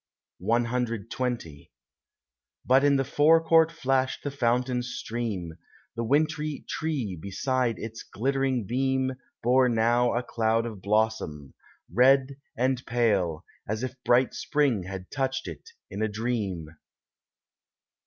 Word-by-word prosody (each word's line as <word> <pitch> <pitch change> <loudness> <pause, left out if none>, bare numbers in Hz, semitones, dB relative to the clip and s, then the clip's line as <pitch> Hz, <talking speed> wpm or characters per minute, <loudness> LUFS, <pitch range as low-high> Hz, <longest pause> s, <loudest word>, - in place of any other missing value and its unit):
CXX 115 - -2 1.0
But 130 +2 +5
in 145 -1 +4
the 135 - +2
forecourt 160 +3 +4
flashed 135 -4 0
the 145 - -3
fountain's 125 -1 0
stream, 105 -8 -4 0.4
The 115 - -2
wintry 150 +3 0
tree 140 - -2
beside 120 - -1
its 115 0 -7
glittering 135 0 -1
beam 130 +3 0 0.3
Bore 125 +2 +4
now 120 +1 +2
a 120 - 0
cloud 115 -1 0
of 110 -5 -7
blossom, 105 -10 -1 0.4
red 135 +4 +4 0.2
and 130 +1 +1
pale, 100 -9 +1 0.2
As 110 +3 -2
if 130 - -3
bright 125 +1 +3
spring 140 - 0
had 95 0 -7
touched 135 -1 -2
it 455 - -9 0.2
in 105 - -4
a 110 - +2
dream. 105 -7 -3
120 Hz, 115 wpm, -27 LUFS, 110-135 Hz, 1.0 s, But